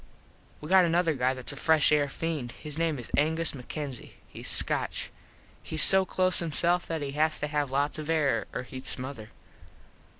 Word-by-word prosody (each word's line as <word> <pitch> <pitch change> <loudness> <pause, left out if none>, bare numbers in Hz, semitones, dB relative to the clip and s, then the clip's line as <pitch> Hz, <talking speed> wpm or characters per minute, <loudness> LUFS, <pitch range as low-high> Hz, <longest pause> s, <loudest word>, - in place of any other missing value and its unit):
We 150 - -7
got 185 +2 +5
another 170 -1 +2
guy 130 -1 0
thats 130 +1 -3
a - - -8
fresh 155 +1 +3
air 150 -1 +3
feend. 150 -5 -4
His 150 -2 -6
name 165 -3 0
is 120 - -9
Angus 160 +2 +1
MacKenzie. 135 0 -7 0.2
Hes - - -9
Scotch. - - +1 0.5
Hes - - +3
so 190 0 +6
close 185 0 +1
himself 170 +2 0
that 160 -3 -3
he 140 - -4
has 155 +2 0
to - - -1
have 150 -2 -2
lots 145 +3 -1
of 155 0 -7
air 155 -4 +1
or 125 - -4
hed 130 +1 -9
smother. 125 -4 -4
150 Hz, 180 wpm, -28 LUFS, 140-165 Hz, 0.5 s, so